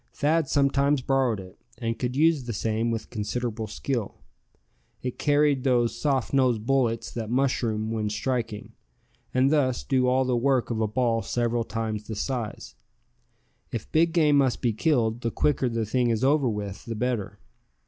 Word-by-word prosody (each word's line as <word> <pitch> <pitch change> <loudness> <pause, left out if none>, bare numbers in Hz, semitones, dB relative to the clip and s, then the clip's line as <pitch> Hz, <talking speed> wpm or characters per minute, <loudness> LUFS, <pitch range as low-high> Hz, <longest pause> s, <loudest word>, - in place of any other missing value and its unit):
Thad 155 0 +1
sometimes 140 -1 +2
borrowed 130 -6 +1
it, 95 -1 -12 0.2
and 115 -2 -3
could 125 0 -2
use 155 -2 +3
the 120 - -3
same 110 +3 -1
with 115 -1 -4
considerable 110 0 -3
skill. 115 +1 -3 0.9
It 125 -1 -4
carried 145 -2 +2
those 120 -3 +2
soft 135 -4 -1
nosed 125 -5 +2
bullets 115 -4 +1
that 115 -2 -5
mushroom 115 -4 0
when 110 -2 -1
striking, 110 0 -3 0.6
and 130 +2 +3
thus 130 -5 +1
do 130 -2 +1
all 130 +1 +3
the 125 -1 +1
work 125 0 +1
of 110 -1 -1
a 110 - +2
ball 115 +1 +1
several 120 0 -1
times 110 -2 -4
the 110 - -4
size. 120 0 -4 1.0
If - - -5
big 165 +1 +3
game 155 -4 +4
must 130 -3 +1
be 120 -2 +2
killed, 115 -2 +1
the 115 - 0
quicker 130 +1 +1
the 115 -1 -1
thing 120 +3 +1
is 115 +1 0
over 140 -1 +3
with 105 -2 -5
the 115 - -4
better. 120 -3 -2
120 Hz, 170 wpm, -26 LUFS, 115-135 Hz, 1.0 s, game